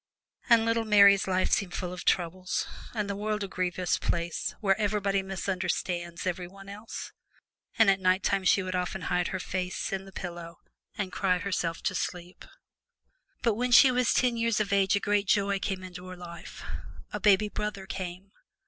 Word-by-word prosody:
And 230 -1 +6
little 230 0 +1
Mary's 200 -3 +6
life 185 0 +1
seemed 185 -3 0
full 180 -1 -3
of 180 - -8
troubles, 185 +1 0 0.3
and 210 -2 -1
the 200 - -3
world 210 +1 -2
a - - -3
grievous 185 -1 -1
place 170 0 -2
where 195 -3 +3
everybody 200 -1 +1
misunderstands 180 -2 -3
everybody 185 +2 -5
else; 210 +3 -7 0.7
and 225 - +6
at 195 0 +4
nighttime 190 +1 +2
she 190 +1 +4
would 185 0 -4
often 180 +1 -2
hide 180 0 0
her - - -3
face 180 +2 -3
in 195 0 -3
the 195 - -12
pillow 170 -2 -7 0.4
and 195 -3 -2
cry 185 -2 +1
herself 170 -3 -2
to 190 - 0
sleep. 180 0 -5 1.0
But 230 - +3
when 245 +4 -1
she 260 +1 +8
was 250 -1 +2
ten 245 -2 +2
years 230 -2 +1
of 200 -1 0
age 195 0 +3
a - - +2
great 205 0 +1
joy 200 -1 +2
came 190 -1 -3
into 180 0 -9
her 185 0 -8
life 170 0 -10 0.5
a - - -2
baby 210 0 +4
brother 210 -2 -4
came! 190 0 -6
190 Hz, 175 wpm, -28 LUFS, 180-205 Hz, 1.0 s, she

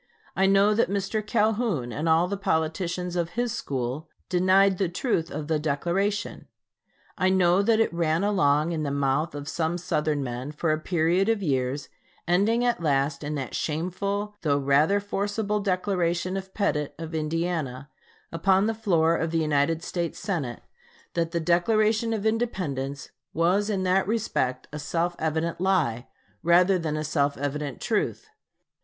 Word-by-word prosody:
I 190 0 +3
know 195 +2 +4
that 220 -2 +2
Mr. 200 +2 -1
Calhoun 210 - 0
and 155 +3 -1
all 165 +2 +4
the 200 - -2
politicians 175 0 -1
of 175 -1 -2
his 240 -1 0
school 135 - -4 0.2
denied 185 +1 +4
the 190 -4 +1
truth 175 -3 -1
of 150 0 -5
the 155 -1 +1
Declaration. 175 +8 -1 0.7
I 185 - +3
know 185 0 +4
that 220 +2 +3
it 225 - +2
ran 165 +1 +1
along 155 -6 +2
in 160 -2 -2
the 150 - -1
mouth 140 +2 0
of 145 0 -6
some 165 +3 -1
Southern 150 -4 -1
men 125 +3 -5
for 155 +1 0
a 155 - 0
period 175 +4 +1
of 220 -3 +1
years, 135 -2 -1 0.4
ending 210 +7 +2
at 240 -7 +1
last 140 -1 0
in 150 +1 -3
that 135 -4 -4
shameful 200 +6 -2
though 145 -3 +2
rather 145 +8 +3
forcible 205 +1 -2
declaration 185 -2 0
of 190 0 -5
Pettit, 150 -8 -1
of 165 0 -7
Indiana, 155 -4 -2 0.4
upon 190 +4 +3
the 225 - +1
floor 170 -7 +2
of 165 0 -1
the 165 - -1
United 155 +1 +1
States 170 -1 -3
Senate, 150 - -3 0.5
that 165 -1 0
the 170 0 -1
Declaration 215 +7 +2
of 220 -2 -2
Independence 165 - -2 0.2
was 185 +6 +2
in 195 -3 0
that 185 +1 +2
respect 165 - -1
"a 150 - -4
self 170 +4 -1
evident 160 +2 -1
lie" 155 -11 +1 0.3
rather 180 +2 +4
than 155 -2 -2
a 155 - -2
self 145 -2 0
evident 145 0 -3
truth. - - -2
170 Hz, 160 wpm, -26 LUFS, 150-195 Hz, 0.7 s, know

